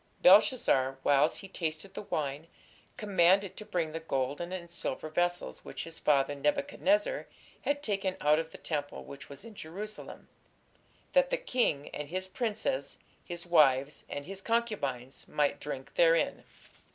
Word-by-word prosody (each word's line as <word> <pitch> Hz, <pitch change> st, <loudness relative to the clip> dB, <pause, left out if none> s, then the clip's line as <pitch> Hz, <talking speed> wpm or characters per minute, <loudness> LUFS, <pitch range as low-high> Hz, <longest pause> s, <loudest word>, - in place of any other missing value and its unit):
Belshazzar, 180 Hz, -, +5 dB
whiles 145 Hz, +2 st, +4 dB
he 195 Hz, -, -7 dB
tasted 165 Hz, 0 st, -4 dB
the -, -, -5 dB
wine, 150 Hz, -5 st, -3 dB, 0.5 s
commanded 195 Hz, -3 st, +3 dB
to -, -, -8 dB
bring 175 Hz, -6 st, -1 dB
the 165 Hz, -, -4 dB
golden 145 Hz, +2 st, -2 dB
and 180 Hz, -2 st, -5 dB
silver 155 Hz, -2 st, -3 dB
vessels 175 Hz, +2 st, -1 dB
which -, -, -6 dB
his 165 Hz, 0 st, -8 dB
father 140 Hz, -1 st, +3 dB
Nebuchadnezzar 290 Hz, -, +1 dB, 0.3 s
had 285 Hz, 0 st, -1 dB
taken 195 Hz, -4 st, -1 dB
out 150 Hz, +1 st, +4 dB
of 160 Hz, 0 st, -4 dB
the -, -, -10 dB
temple 145 Hz, -3 st, -3 dB
which 140 Hz, 0 st, -10 dB
was 140 Hz, +9 st, -9 dB
in 230 Hz, -, -10 dB
Jerusalem; 205 Hz, +4 st, -7 dB, 0.9 s
that -, -, +5 dB
the -, -, +1 dB
king, 245 Hz, -, 0 dB
and 150 Hz, -1 st, -6 dB
his 185 Hz, +2 st, -2 dB
princes, 235 Hz, -, -2 dB, 0.3 s
his 175 Hz, -1 st, -7 dB
wives, 145 Hz, -4 st, +4 dB
and 145 Hz, 0 st, -5 dB
his 195 Hz, +1 st, -6 dB
concubines, 190 Hz, -, -2 dB
might 145 Hz, -1 st, +1 dB
drink 135 Hz, -2 st, -6 dB
therein.... 165 Hz, -1 st, +3 dB
170 Hz, 150 wpm, -31 LUFS, 145-205 Hz, 0.9 s, Belshazzar